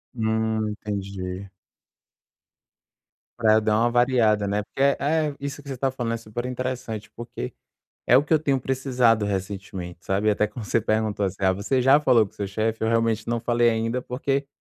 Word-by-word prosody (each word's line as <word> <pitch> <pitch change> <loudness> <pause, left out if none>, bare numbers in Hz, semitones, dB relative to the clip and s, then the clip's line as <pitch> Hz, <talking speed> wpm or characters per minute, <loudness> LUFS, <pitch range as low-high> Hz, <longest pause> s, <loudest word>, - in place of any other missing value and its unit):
Hum, 110 -1 0
entendi. 100 -2 -5 1.9
Pra 110 -2 +5
eu 110 - +4
dar 105 0 +2
uma 120 +1 +3
variada, 120 -4 +3
né, 100 +1 0
porque 135 - -7
é 140 0 +4
é, 150 0 0
isso 140 +1 -5
que 145 - -16
você 135 - -4
está 135 +2 0
falando 120 -3 -3
é - - -1
super 115 +2 -6
interessante, 125 -4 -4
porque 120 - -6 0.6
é 125 - +6
o 135 - +5
que 155 - -2
eu - - +5
tenho 140 -4 +1
precisado 125 -4 +2
recentemente, 95 -3 -5
sabe, 100 +3 +1
até 105 +1 +2
quando 110 +1 -8
você 115 - +1
perguntou 110 -1 0
assim: 95 0 -2
"Ah, 95 -1 +3
você 105 +7 0
já 135 +4 +5
falou 115 -7 +4
com - - -18
seu 100 - -4
chefe?", 110 +3 -2
eu 110 - +2
realmente 115 -1 +1
não 120 0 0
falei 120 0 +3
ainda, 115 +3 -1
porque 135 +2 -2
115 Hz, 190 wpm, -24 LUFS, 105-125 Hz, 1.9 s, é